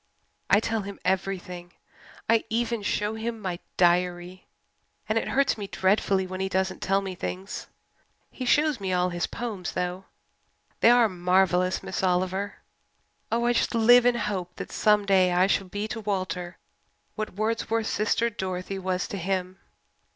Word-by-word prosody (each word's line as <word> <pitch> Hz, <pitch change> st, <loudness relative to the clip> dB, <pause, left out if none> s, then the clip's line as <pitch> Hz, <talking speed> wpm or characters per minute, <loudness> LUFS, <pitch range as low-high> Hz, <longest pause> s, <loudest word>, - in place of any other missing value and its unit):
I 200 Hz, -, +6 dB
tell 225 Hz, 0 st, -1 dB
him 200 Hz, 0 st, -8 dB
everything 185 Hz, -2 st, -2 dB, 0.5 s
I 225 Hz, 0 st, +3 dB
even 235 Hz, 0 st, -1 dB
show 210 Hz, +1 st, -1 dB
him 225 Hz, +1 st, -4 dB
my 185 Hz, -4 st, -4 dB, 0.2 s
diary. 180 Hz, +1 st, +1 dB, 0.6 s
And 215 Hz, +1 st, +2 dB
it -, -, -5 dB
hurts 275 Hz, -4 st, +1 dB
me 200 Hz, -, -4 dB
dreadfully 190 Hz, 0 st, +1 dB
when 185 Hz, 0 st, -6 dB
he 190 Hz, 0 st, -1 dB
doesn't 190 Hz, 0 st, -1 dB
tell 195 Hz, +1 st, +2 dB
me 190 Hz, -1 st, -5 dB
things. 185 Hz, +2 st, -5 dB, 0.6 s
He 255 Hz, -, -6 dB
shows 295 Hz, +1 st, +3 dB
me 190 Hz, -2 st, -2 dB
all 180 Hz, 0 st, +2 dB
his 175 Hz, 0 st, -2 dB
poems, 210 Hz, -7 st, -5 dB
though 180 Hz, +1 st, -3 dB, 0.7 s
they -, -, +6 dB
are 240 Hz, -1 st, +6 dB
marvellous, 185 Hz, 0 st, +2 dB
Miss -, -, -3 dB
Oliver. 185 Hz, +2 st, 0 dB, 0.8 s
Oh, 235 Hz, +1 st, +1 dB
I 240 Hz, -, +3 dB
just 235 Hz, -, 0 dB
live 245 Hz, +2 st, +6 dB
in 245 Hz, -, +5 dB
the -, -, -2 dB
hope 185 Hz, -4 st, -3 dB
that -, -, -7 dB
some 210 Hz, -1 st, +3 dB
day 185 Hz, -2 st, +4 dB
I 180 Hz, +1 st, +4 dB
shall 195 Hz, 0 st, +1 dB
be 205 Hz, +3 st, -4 dB
to 225 Hz, -, -4 dB
Walter 185 Hz, -3 st, -3 dB, 0.6 s
what 215 Hz, -4 st, -5 dB
Wordsworth's 225 Hz, +1 st, -1 dB
sister 225 Hz, +2 st, +1 dB
Dorothy 190 Hz, -2 st, -4 dB
was 185 Hz, 0 st, -1 dB
to 200 Hz, -, -5 dB
him. 185 Hz, +1 st, -2 dB
195 Hz, 165 wpm, -26 LUFS, 185-220 Hz, 0.8 s, I